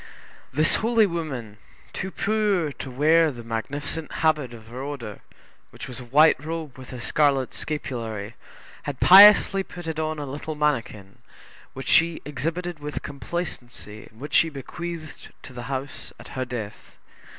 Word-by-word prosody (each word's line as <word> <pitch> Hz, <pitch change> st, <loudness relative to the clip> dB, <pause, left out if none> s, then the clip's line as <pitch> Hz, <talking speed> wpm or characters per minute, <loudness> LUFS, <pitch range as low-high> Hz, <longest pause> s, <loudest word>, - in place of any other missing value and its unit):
This 155 Hz, +3 st, +3 dB
holy 225 Hz, -1 st, +3 dB
woman, 140 Hz, -, -4 dB, 0.4 s
too 190 Hz, -, -4 dB
poor 200 Hz, -6 st, 0 dB
to 135 Hz, -, -8 dB
wear 155 Hz, +5 st, +4 dB
the 120 Hz, -5 st, -8 dB
magnificent 145 Hz, +7 st, -4 dB
habit 150 Hz, -6 st, +2 dB
of 115 Hz, -2 st, -12 dB
her 125 Hz, +2 st, -7 dB
order, 135 Hz, -7 st, -6 dB, 0.5 s
which -, -, -9 dB
was 125 Hz, -, -6 dB
a 125 Hz, -, -9 dB
white 150 Hz, +4 st, +5 dB
robe 160 Hz, -3 st, -5 dB
with 130 Hz, -1 st, -11 dB
a 125 Hz, -, -7 dB
scarlet 140 Hz, -1 st, +1 dB
scapulary, 115 Hz, -8 st, -4 dB, 0.6 s
had 140 Hz, -, -6 dB
piously 195 Hz, 0 st, +8 dB
put 175 Hz, -2 st, -9 dB
it 160 Hz, -1 st, -3 dB
on 155 Hz, 0 st, -1 dB
a 145 Hz, -, -4 dB
little 145 Hz, +3 st, -5 dB
manikin, 115 Hz, -10 st, -2 dB, 0.5 s
which 135 Hz, -1 st, -7 dB
she 165 Hz, 0 st, +4 dB
exhibited 165 Hz, +4 st, -3 dB
with 150 Hz, 0 st, -5 dB
complacency 130 Hz, -, -6 dB
and 110 Hz, -, -21 dB
which 145 Hz, +3 st, -8 dB
she 165 Hz, -, +5 dB
bequeathed 160 Hz, +3 st, -7 dB
to 130 Hz, -, -11 dB
the 120 Hz, -1 st, -7 dB
house 135 Hz, +1 st, -5 dB
at -, -, -12 dB
her 130 Hz, -1 st, -3 dB
death. 115 Hz, -4 st, -7 dB
145 Hz, 155 wpm, -25 LUFS, 125-165 Hz, 0.6 s, piously